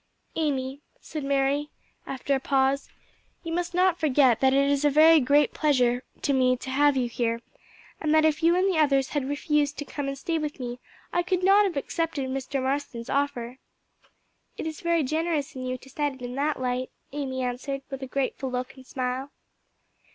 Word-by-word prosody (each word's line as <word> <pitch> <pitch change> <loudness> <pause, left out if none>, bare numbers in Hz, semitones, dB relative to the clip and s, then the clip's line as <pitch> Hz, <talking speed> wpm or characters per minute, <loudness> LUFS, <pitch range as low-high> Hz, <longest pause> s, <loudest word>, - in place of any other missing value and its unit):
"Amy," 275 -3 -1 0.4
Mary 280 +1 +1 0.4
said - - -4
after 270 +1 -1
a 270 - +2
pause, 270 +1 +1 0.5
"you 330 -1 -4
must 350 0 -2
not 360 -1 +3
forget 270 -5 +4
that 265 0 +4
it 275 +1 +3
is 285 0 +1
a 295 - +5
very 315 +3 +7
great 285 +2 +3
pleasure 250 -5 +2 0.2
to 280 - +2
me 255 -1 +3
to 260 - -7
have 285 +1 +3
you 250 -2 +1
here, 230 0 -1 0.6
and 305 - 0
that 315 0 +5
if 310 -1 +2
you 335 +1 +4
and 370 +2 +3
the 365 -5 +1
others 275 -3 +3
had 280 -3 -2
refused 295 0 0
to 290 - -4
come 285 0 -4
and 275 0 -3
stay 330 +3 -1
with 300 -2 -4
me 245 -1 -5 0.3
I 350 - +3
could 365 0 -1
not 400 +2 +6
have 355 -7 -2
accepted 300 -2 -2
Mr. 270 0 -2
Marston's 260 -3 -3
offer." 260 -3 -1 1.0
"It - - -4
is 315 -1 -5
very 340 -2 +2
generous 315 +1 -1
in 255 -1 -5
you 255 0 -2
to 255 - -17
set 290 0 -1
it 255 - -12
in 245 0 -5
that 290 +2 -1
light," 255 0 -1 0.2
Amy 265 -2 -3
answered, 260 +3 -3
with 270 0 -5
a 265 - -5
grateful 265 0 -2
look 250 +1 -3
and 260 -1 -14
smile. 255 +1 -3
275 Hz, 195 wpm, -26 LUFS, 260-305 Hz, 1.0 s, very